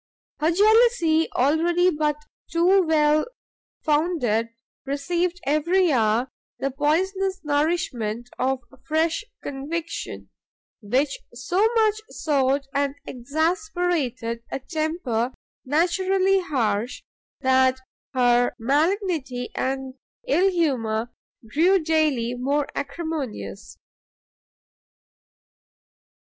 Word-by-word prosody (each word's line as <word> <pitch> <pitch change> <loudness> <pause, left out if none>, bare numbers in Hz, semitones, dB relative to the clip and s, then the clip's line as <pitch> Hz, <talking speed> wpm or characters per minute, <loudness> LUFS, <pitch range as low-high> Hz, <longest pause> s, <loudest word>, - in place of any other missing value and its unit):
Her 310 - +2
jealousy, 410 -5 +4
already 340 +7 +3
but 300 -2 0 0.4
too 355 +4 +4
well 305 -1 +3 0.6
founded, 295 -8 +1 0.3
received 340 +6 -1
every 340 +5 +2
hour 230 0 +2 0.3
the 275 - -2
poisonous 375 +7 0
nourishment 290 -7 -1
of 260 0 0 0.3
fresh 320 +9 +1 0.2
conviction, 320 +5 -5 0.5
which 265 +7 0 0.2
so 250 +10 -2 0.2
much 435 -1 +3
soured 275 -2 0
and 280 0 0
exasperated 310 - -1
a - - -1
temper 265 -5 -2 0.3
naturally 375 +6 +2
harsh, 245 - -1 0.4
that 260 0 +3 0.4
her 245 -1 +3
malignity 290 - 0
and 265 0 -3 0.3
ill 390 -5 +3
humour 240 - 0 0.4
grew 340 - +4
daily 305 -8 +1
more 275 +4 0
acrimonious. 275 - -5
295 Hz, 80 wpm, -24 LUFS, 255-345 Hz, 0.6 s, jealousy